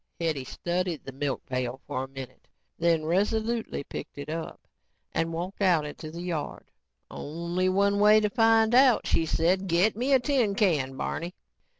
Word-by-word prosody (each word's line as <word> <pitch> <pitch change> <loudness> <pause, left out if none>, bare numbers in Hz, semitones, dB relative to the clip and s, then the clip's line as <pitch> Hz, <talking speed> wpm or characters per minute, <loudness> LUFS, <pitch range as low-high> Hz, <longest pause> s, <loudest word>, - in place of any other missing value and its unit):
Hetty 155 -6 -1
studied 175 +3 -3
the 135 - -6
milk 135 0 -3
pail 130 0 -3
for 130 - -3
a - - -6
minute 135 -1 -10 0.3
and 170 - -2
then 165 -2 +3
resolutely 220 +3 0
picked - - -8
it 145 +1 -7
up 160 +1 -5 0.5
and 165 0 -1
walked 175 +5 -5
out 175 -6 +3
into 150 +1 -7
the 170 +2 -7
yard. 170 -4 -5 0.4
"Only 170 +4 -2
one 200 +2 +2
way 210 +1 +7
to 210 -1 0
find 225 0 +4
out," 255 -2 +5
she 165 - +1
said. 185 +5 +1
"Get 180 +5 +2
me 250 +5 -1
a 265 - +6
tin 245 -6 +1
can, 150 -11 +1
Barney." 170 +6 -4
175 Hz, 175 wpm, -27 LUFS, 155-210 Hz, 0.5 s, way